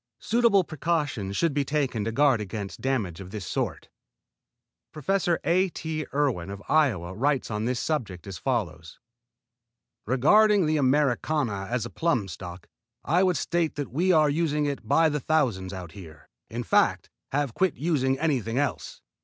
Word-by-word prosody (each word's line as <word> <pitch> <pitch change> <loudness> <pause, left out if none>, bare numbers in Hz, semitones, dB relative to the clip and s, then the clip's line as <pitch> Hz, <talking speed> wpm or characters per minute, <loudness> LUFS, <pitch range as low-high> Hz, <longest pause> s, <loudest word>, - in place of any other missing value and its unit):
Suitable 230 -4 +3
precautions 150 - -2
should 165 -3 +1
be 145 0 +1
taken 140 -6 -1
to 115 - -1
guard 135 -2 +3
against 100 -1 -6
damage 110 -11 -1
of 95 -2 -9
this 100 -2 -6
sort. - - -3 1.0
Prof. 185 +6 -1 0.2
A. 185 +2 +2
T. 160 -2 -4
Erwin 130 -12 0
of 100 0 -6
Iowa 105 - +2
writes 135 +4 0
on 105 +1 -2
this 125 0 -1
subject 110 - -3
as 95 -3 -7
follows: 85 - -3 1.1
"Regarding 200 - +4
the 155 0 +1
Americana 135 -6 +1
as 120 -2 -1
a 120 - -7
plum 125 -12 0
stock, 90 -1 -9 0.4
I 175 +3 +2
would 185 -4 +2
state 170 -2 -1
that 145 -2 -4
we 175 +8 +2
are 155 -3 +5
using 150 0 0
it 140 -6 -4
by 160 +6 +4
the 150 -1 -1
thousands 125 -11 0
out 90 -4 -7
here; 85 -5 -13 0.2
in - - -4
fact, - - +2 0.2
have 145 0 0
about - - -29
quit 190 -3 +2
using 135 -4 +1
anything 130 -7 -1
else. 110 - -2
135 Hz, 160 wpm, -26 LUFS, 105-155 Hz, 1.1 s, are